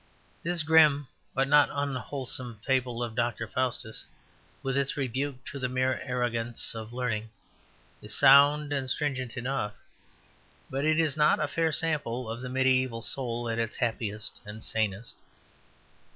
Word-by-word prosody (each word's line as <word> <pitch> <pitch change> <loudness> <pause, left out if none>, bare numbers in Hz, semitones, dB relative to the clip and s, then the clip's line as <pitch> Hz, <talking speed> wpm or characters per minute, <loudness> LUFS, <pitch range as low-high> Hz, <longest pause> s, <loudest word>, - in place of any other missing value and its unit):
This 170 -1 +1
grim 150 -2 +5 0.3
but 135 +1 +2
not 145 +1 +6
unwholesome 130 -4 -3
fable 125 -2 0
of 115 -2 -4
Dr. 120 -1 -1
Faustus, 120 -2 -2 0.6
with 135 -1 -1
its 140 0 0
rebuke 135 0 -2
to 140 - -6
the 130 -1 -1
mere 130 0 0
arrogance 120 -2 -2
of 110 0 -7
learning, 115 -3 -2 0.7
is - - -2
sound 145 +2 +6
and 135 -2 -1
stringent 130 -4 -2
enough; 125 -4 -2 1.0
but 135 +2 -1
it 155 +1 +3
is 155 -3 +2
not 150 -1 +4
a 150 - +1
fair 165 +2 +1
sample 140 -7 -1
of 115 +2 -5
the 130 - -5
mediaeval 130 -2 +1
soul 120 -3 -2
at 115 0 -1
its 115 -1 -2
happiest 110 -3 -3
and 105 +1 -8
sanest. 110 0 -2
130 Hz, 145 wpm, -28 LUFS, 115-140 Hz, 1.0 s, not